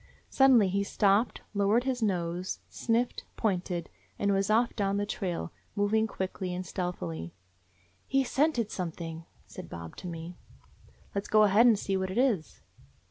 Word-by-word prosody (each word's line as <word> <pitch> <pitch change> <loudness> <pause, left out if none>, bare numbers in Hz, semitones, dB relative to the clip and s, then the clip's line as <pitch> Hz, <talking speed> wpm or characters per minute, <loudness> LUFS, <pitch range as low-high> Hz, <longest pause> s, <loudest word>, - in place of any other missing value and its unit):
Suddenly 255 -7 +6
he 200 +2 +1
stopped, 200 +3 +2
lowered 205 +4 +3
his 255 -2 -1
nose, 180 -3 -1
sniffed, 235 +1 -1
pointed, 180 -5 -1 0.3
and 200 0 +1
was 195 +1 +1
off 230 +3 +3
down 200 -2 0
the 205 - 0
trail, 180 - -3 0.2
moving 215 +2 +2
quickly 185 -2 -4
and 185 +1 -4
stealthily. 85 - -4 0.7
"He 270 0 +2
's 255 - -7
scented 265 -7 +2
something," 165 -2 -5 0.2
said - - -10
Bob 85 -1 -8
to - - -7
me. 170 +1 -7 0.8
"Let 200 0 -2
's - - -7
go 215 0 +5
ahead 210 +4 +6
and 225 -3 +5
see 195 -1 -1
what 190 0 -2
it 185 - -4
is." 235 -11 0
200 Hz, 160 wpm, -29 LUFS, 180-220 Hz, 0.8 s, Suddenly